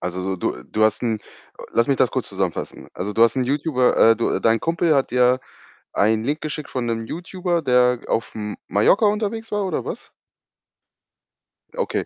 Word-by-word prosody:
also 90 +1 -4
so 95 0 -2
du 60 -7 -3
du 110 - -2
hast 110 -1 +2
'n 115 -3 0 0.4
Äh, - - -9
lass 115 - +3
mich 140 - +2
das - - +2
kurz - - -3
zusammenfassen. - - -4
Also 100 +3 -4
du 115 - +3
hast 115 +2 +4
'n 130 - +1
Youtuber 140 -1 +1
äh, 115 0 +6
du 115 - 0
dein 115 0 +2
Kumpel 165 -1 +1
hat 135 - +1
dir 125 +1 +3 0.5
einen 110 +2 +2
Link 150 +4 -1
geschickt 150 -1 -5
von 125 -2 -2
'nem 115 -1 -2
Youtuber, 175 +1 -3
der 125 -1 +3
auf 115 - -1
M 105 -1 -5
Mallorca 195 - +4
unterwegs 220 +2 -1
war 205 -1 0
oder 185 - -2
was? - - -7 1.6
Okay, 485 0 -2
125 Hz, 190 wpm, -22 LUFS, 110-165 Hz, 1.6 s, äh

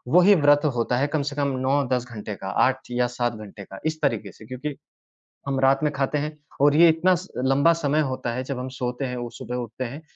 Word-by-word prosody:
वही 190 +3 +7
व्रत 145 -1 +4
होता 120 +1 0
है 140 +3 +1
कम 150 0 -1
से - - -8
कम 140 -1 0 0.2
9-10 130 -3 +1
घंटे 105 -1 -6
का, 95 - -8
8 130 +6 +2
या 125 0 +1
7 120 -1 -2
घंटे 105 -1 -10
का 95 0 -11
इस 155 0 -2
तरीक़े 110 -9 -1
से 110 - -15
क्योंकि 130 +5 -5 0.7
हम 135 -1 0
रात 135 0 +4
में 150 - +1
ख़ाते 140 +2 -1
हैं 150 +1 -4 0.2
और 145 +1 +5
ये 170 +1 +8
इतना 165 +3 +3 0.3
लंबा 140 +5 +4
समय 145 +2 +2
होता 120 -2 -3
है 130 - -3
जब 135 -1 -4
हम 125 +1 -4
सोते 125 +1 -3
हैं 125 -1 -3
और 120 -1 -5
सुबह 125 -1 -6
उठते 120 +1 -5
हैं। 140 +6 -7
130 Hz, 230 wpm, -24 LUFS, 120-145 Hz, 0.7 s, ये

